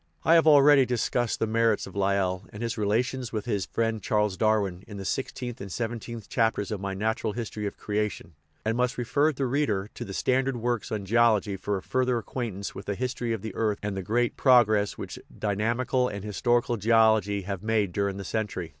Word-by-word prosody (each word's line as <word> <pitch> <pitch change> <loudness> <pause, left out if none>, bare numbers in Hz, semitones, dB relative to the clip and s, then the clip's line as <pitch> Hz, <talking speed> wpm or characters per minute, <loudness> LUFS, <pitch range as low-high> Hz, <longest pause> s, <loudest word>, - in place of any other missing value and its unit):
I 165 - +5
have 165 -1 +5
already 145 -2 +7
dis 125 -2 0
cussed 120 -2 0
the - - 0
merits 115 -1 +1
of - - -12
Lyell, 95 -2 0
and 105 +3 -7
his 115 - -2
relations 120 +4 -1
with 105 -2 -3
his 100 -5 -1
friend 115 -1 -1
Charles 105 -2 +1
Darwin, 100 -4 +1
in 105 - -8
the 95 - -6
sixteenth 125 +1 -4
and 100 -1 -7
seventeenth 115 0 -5
chapters 110 -3 0
of 105 -3 -3
my 100 0 -3
Natural 110 +1 -1
History 105 -2 -4
of - - -7
Creation, 105 -4 -3 0.3
and 110 +1 +1
must 125 0 0
refer 140 +5 +2
the 135 -2 -2
reader 120 -7 0
to - - -6
the 95 - -7
standard 130 0 +1
works 120 -1 -2
on 105 -3 -3
geology 110 -2 +3
for 100 +1 -2
a 95 - -8
further 125 -1 +1
acquaintance 115 -4 -4
with 100 - -9
the 100 - -1
history 125 0 -2
of 110 -4 -3
the 110 - -5
earth 105 -2 0
and 105 -1 -2
the 95 - -3
great 115 +5 0
progress 110 -6 +4
which - - -7 0.2
dynamical 115 +5 0
and 100 -4 -5
historical 120 +3 +1
geology 110 -2 +3
have 100 -1 -4
made 110 -3 +1
during 100 +1 -1
the 100 - -5
century. 100 -5 -3
110 Hz, 205 wpm, -27 LUFS, 100-120 Hz, 0.3 s, already